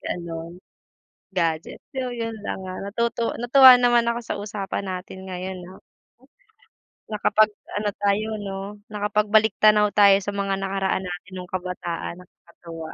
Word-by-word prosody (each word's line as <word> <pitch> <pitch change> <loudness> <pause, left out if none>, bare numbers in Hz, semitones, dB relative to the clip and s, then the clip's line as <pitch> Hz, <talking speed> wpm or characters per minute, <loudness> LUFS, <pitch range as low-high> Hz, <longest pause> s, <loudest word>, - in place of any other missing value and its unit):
Gano’n. 170 0 -6 0.8
Gadget, 165 -3 -1
so 260 -2 -2
yun 230 -2 -4
lang, - - -4
ah, 185 0 -6
natutu 235 +1 -1
natuwa 255 +1 +8
naman 240 -1 +4
ako 235 - -1
sa - - -3
usapan 205 -1 -4
natin 190 +1 -7
ngayon, 185 0 -5
ah. 190 - -14 1.3
Nakapag-ano 210 0 +1
tayo 205 +2 +2
'no, 195 -2 -5 0.3
nakapagbaliktanaw 210 0 +3
tayo 200 -1 +7
sa 200 +1 -4
mga 195 -1 -1
nakaraan 195 0 -1
natin 180 +2 -8
nung 180 - -8
kabataan 180 -1 -5
nakakatuwa. 170 -2 -11
200 Hz, 125 wpm, -23 LUFS, 180-215 Hz, 1.3 s, natuwa